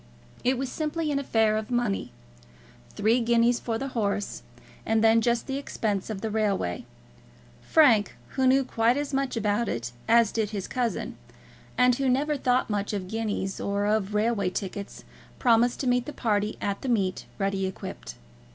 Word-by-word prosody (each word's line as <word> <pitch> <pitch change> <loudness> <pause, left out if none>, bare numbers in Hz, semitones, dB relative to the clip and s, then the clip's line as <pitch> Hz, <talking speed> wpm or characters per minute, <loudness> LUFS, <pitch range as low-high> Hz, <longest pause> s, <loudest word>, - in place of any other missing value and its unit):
It 255 +1 +2
was 260 0 -3
simply 310 0 -2
an 280 - +1
affair 225 -5 +2
of 215 0 -4
money. 240 -5 -1 0.8
Three 220 +4 +3
guineas 235 0 +3
for 225 -2 -2
the 275 +4 -4
horse, 205 -4 -2 0.4
and 225 0 +1
then 225 0 +5
just 235 0 +1
the 270 0 -3
expense 210 -8 -2
of 205 -3 -4
the 220 -1 -3
railway. 200 - -1 0.8
Frank, 240 -10 +4
who 265 -1 +1
knew 270 +1 +5
quite 235 0 +1
as 290 -1 -3
much 270 -2 -1
about 210 +1 0
it 120 +1 -3 0.2
as 230 -1 +5
did 220 -2 -1
his 200 -3 -4
cousin, 245 -3 -2 0.6
and 250 0 +5
who 270 -1 +1
never 290 +4 +1
thought 255 -2 +1
much 205 -1 -2
of 190 -3 -4
guineas 215 -3 -2
or 200 0 -1
of 210 -1 0
railway 210 -3 +1
tickets, 200 +1 -6 0.3
promised 240 0 +3
to 265 - -2
meet 245 0 +1
the 295 - -5
party 210 -2 0
at 200 -1 -2
the 265 - -3
meet 195 -6 0
ready 195 -1 0
equipped. - - -7
225 Hz, 170 wpm, -27 LUFS, 205-250 Hz, 0.8 s, then